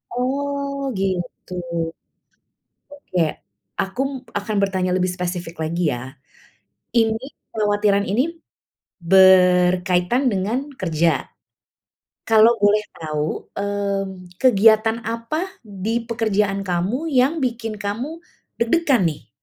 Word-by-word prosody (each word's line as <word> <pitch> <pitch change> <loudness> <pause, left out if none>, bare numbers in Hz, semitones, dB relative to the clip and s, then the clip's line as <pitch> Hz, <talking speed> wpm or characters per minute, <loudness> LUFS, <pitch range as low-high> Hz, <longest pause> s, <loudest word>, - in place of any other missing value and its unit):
Oh 280 +2 -2
gitu. 185 -1 -3 1.4
Oke, 285 -10 -5 0.6
aku 250 +8 -1 0.3
akan 210 +1 -4
bertanya 185 -2 0
lebih 185 0 +1
spesifik 175 -2 -4
lagi 170 +3 -1
ya. 120 +1 -5 0.9
Ini, 225 +1 +2 0.3
kekhawatiran 205 -2 +2
ini 210 +6 +1 0.8
berkaitan 180 +3 +5
dengan 225 +9 -1
kerja? 165 -2 +2 1.2
Kalau 225 +1 +7
boleh 210 +1 +4
tahu, 155 -1 -3
mmm, 195 -3 -3
kegiatan 225 -2 +5
apa 230 +11 -3 0.2
di 215 +4 -3
pekerjaan 210 -4 0
kamu 195 - -1
yang 280 +4 +2
bikin 235 -3 -2
kamu 245 +12 -4 0.4
deg-degan 260 +1 +2
nih? 150 - -10
205 Hz, 95 wpm, -21 LUFS, 185-240 Hz, 1.4 s, Kalau